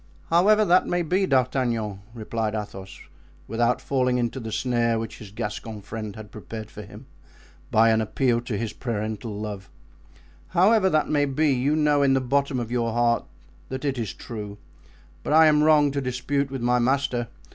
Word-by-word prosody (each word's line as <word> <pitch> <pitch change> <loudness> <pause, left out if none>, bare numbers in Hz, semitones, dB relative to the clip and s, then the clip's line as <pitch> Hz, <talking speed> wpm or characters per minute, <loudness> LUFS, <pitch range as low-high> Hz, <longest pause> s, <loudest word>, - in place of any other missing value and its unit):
"However 210 +6 +5
that 180 0 +4
may 175 0 0
be, 185 +4 +1
D'Artagnan," 120 - 0 0.2
replied 110 -1 -3
Athos, 95 -3 -7 0.5
without 120 +2 +1
falling 125 -2 0
into 120 +2 -2
the 110 -2 -6
snare 120 -1 +1
which 110 0 -6
his 105 - -10
Gascon 105 +1 -5
friend 110 -1 -6
had 110 -1 -10
prepared 110 +1 -8
for 105 - -9
him 100 - -12 0.6
by 115 +1 +4
an 110 0 +2
appeal 120 +2 +1
to 120 -3 -4
his 110 0 -3
parental 110 -2 -4
love, 105 -3 -6 0.9
"however 190 +1 +5
that 155 -3 +1
may 145 -1 +2
be, 145 +2 +1
you 135 +4 +1
know 150 -2 +3
in 135 -1 +4
the - - +3
bottom 135 +1 0
of 120 -1 -5
your 115 -2 0
heart 120 0 +2 0.4
that 130 +1 -5
it 135 -3 -1
is 110 -6 -3
true; 105 +3 -8 0.6
but - - -2
I 160 +1 +7
am 150 -1 +5
wrong 150 -2 +5
to 140 0 -2
dispute 135 +2 -1
with 135 -3 -5
my 125 0 +3
master. 125 -1 0
120 Hz, 180 wpm, -24 LUFS, 110-140 Hz, 0.9 s, I